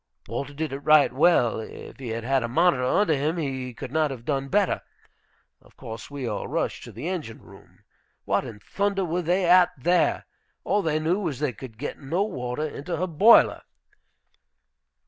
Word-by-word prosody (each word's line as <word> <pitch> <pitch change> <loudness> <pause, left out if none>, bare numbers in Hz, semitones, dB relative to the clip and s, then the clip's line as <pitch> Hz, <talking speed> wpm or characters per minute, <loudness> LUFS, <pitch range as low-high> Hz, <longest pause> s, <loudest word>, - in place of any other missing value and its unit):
Walter 140 +1 -5
did 155 -1 -3
it 135 - -4
right 150 0 +5
well; 125 -11 +3
if 110 - -10
he 130 - -7
had 115 0 -4
had 135 +2 +1
a 120 - -2
monitor 130 +2 +2
under 160 +7 +2
him 150 +4 -1
he 130 -5 -3
could 120 +1 -8
not 155 0 +1
have 125 -4 -8
done 135 -2 -1
better. 200 +5 +1 0.8
Of - - -23
course 110 0 -8
we 140 -2 -5
all 105 -3 -3
rushed - - -2
to - - -10
the 160 - -6
engine 160 -12 -4
room. - - -18 0.4
What - - +1
in 110 -3 -9
thunder 200 - -1
were 175 +2 -1
they 180 +2 +1
at 180 0 +6
there? 175 +7 +1 0.4
All 205 - +1
they 155 -4 0
knew 165 +5 0
was 165 -10 -3
they 145 -2 -1
could 115 0 -11
get 145 - -5
no 165 +8 -1
water 140 -6 -3
into 155 +3 -5
her 180 - 0
boiler. 185 +7 +5
150 Hz, 185 wpm, -25 LUFS, 130-175 Hz, 0.8 s, at